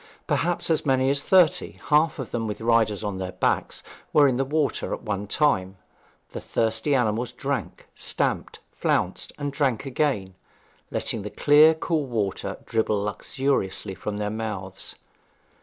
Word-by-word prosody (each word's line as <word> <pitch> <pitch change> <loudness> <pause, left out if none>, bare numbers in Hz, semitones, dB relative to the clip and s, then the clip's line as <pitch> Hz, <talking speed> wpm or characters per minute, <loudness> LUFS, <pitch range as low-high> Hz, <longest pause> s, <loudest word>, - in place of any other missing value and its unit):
Perhaps 175 0 +1
as 160 - +2
many 130 -1 +2
as 140 0 +1
thirty, 180 -2 +4 0.2
half 155 +2 +4
of 130 -5 -6
them 115 -2 -2
with 105 -1 -4
riders 110 -2 +2
on 100 -2 -3
their 95 -1 -4
backs, - - 0 0.3
were 145 -2 +7
in 130 -2 +1
the 135 - +2
water 145 +1 0
at - - -15
one 105 -2 -3
time; 100 -9 +1 0.5
the - - -6
thirsty 110 +5 0
animals 120 -1 0
drank, 135 -5 -4
stamped, - - -1
flounced, - - -1
and 145 -1 -3
drank 135 -4 0
again, 130 -8 -1 0.6
letting 115 - -2
the 105 - -5
clear, 150 +8 +6
cool 160 -3 -1
water 105 -6 -2
dribble 110 -2 0
luxuriously 105 -2 -1
from 105 +2 -5
their 105 0 -2
mouths. 105 -4 -5
120 Hz, 150 wpm, -25 LUFS, 105-145 Hz, 0.6 s, were